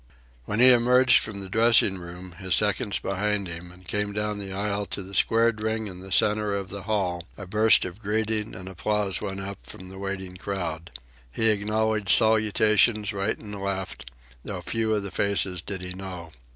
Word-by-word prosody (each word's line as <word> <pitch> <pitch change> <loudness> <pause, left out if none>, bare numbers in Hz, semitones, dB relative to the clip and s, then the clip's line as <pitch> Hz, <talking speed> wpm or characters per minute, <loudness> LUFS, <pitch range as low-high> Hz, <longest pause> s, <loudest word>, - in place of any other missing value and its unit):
When 105 - -2
he 130 +1 +9
emerged 125 +1 +5
from 100 -3 -5
the 95 - -5
dressing 110 -2 +4
room, 90 +1 -9
his 95 -2 0
seconds 105 +1 0
behind 100 +1 -1
him, 85 +1 -7
and 90 0 -16
came 105 0 -2
down 105 0 -2
the 100 -1 -6
aisle 100 +1 -2
to 100 - -5
the 95 +1 -12
squared 115 +2 +3
ring 110 0 -1
in 95 -3 -8
the 95 +1 -11
centre 105 +1 +2
of 100 -1 -4
the 100 +1 -6
hall, 95 -4 -2
a 100 - -7
burst 110 +4 +4
of 95 +2 -7
greeting 110 +1 -1
and 95 0 -9
applause 100 0 -1
went 95 0 -4
up 100 0 -6
from 95 0 -10
the 95 0 -10
waiting 95 -2 -5
crowd. 85 -4 -4 0.4
He 110 - +2
acknowledged 110 0 0
salutations 110 0 +3
right 100 +1 -1
and 105 -2 -9
left, 95 -9 -4 0.3
though - - -5
few 110 -1 -1
of 105 - -2
the 100 - -5
faces 95 -3 +1
did 95 +1 -6
he 90 0 -6
know. 90 -3 -8
100 Hz, 190 wpm, -25 LUFS, 95-110 Hz, 0.4 s, he